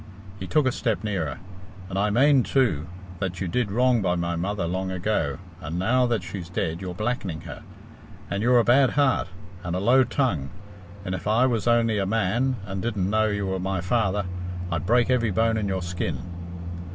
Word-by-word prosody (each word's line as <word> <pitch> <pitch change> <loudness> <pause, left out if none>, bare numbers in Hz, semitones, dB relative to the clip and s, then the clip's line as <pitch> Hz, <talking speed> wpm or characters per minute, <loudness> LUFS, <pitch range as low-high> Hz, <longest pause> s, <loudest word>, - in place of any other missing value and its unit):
He 95 - -5
took 150 +5 +2
a 130 - +3
step 110 -5 -1
nearer. 95 -8 -2 0.5
"And 95 +1 -3
I 105 +1 +2
mane, 135 +5 +5
too, 110 - +1 0.3
that 95 -1 -3
you 95 - -2
did 115 +5 0
wrong 125 +1 +3
by 90 -2 +1
my 85 0 -1
mother 95 +2 -2
long 95 +2 -2
ago, 90 -6 -1 0.2
and 80 0 -4
now 125 +7 +2
that 115 -6 0
she's 85 -1 -6
dead 85 -1 -2
you're 90 -2 -5
blackening 100 -7 -2
her; - - -9 0.7
and 100 - -2
you're 125 +2 +4
a 120 - +5
bad 130 +3 +5
heart, 135 -7 +3 0.4
and 90 0 -2
a - - 0
low 125 +6 +5
tongue, 120 - 0 0.6
and 90 - -2
if 90 - -4
I 110 +4 +4
was 120 -3 0
only 115 -2 +3
a 95 - 0
man, 115 +5 +1
and 95 -2 -4
didn't 100 -4 -1
know 110 0 +3
you 105 -1 -1
were 95 0 -2
my 95 0 -1
father, 100 +1 0 0.5
I'd 85 +1 -2
break 120 +2 +3
every 120 -3 +2
bone 115 +4 +2
in 105 -2 -1
your 95 -2 -2
skin." 85 0 -3
100 Hz, 200 wpm, -25 LUFS, 90-120 Hz, 0.7 s, mane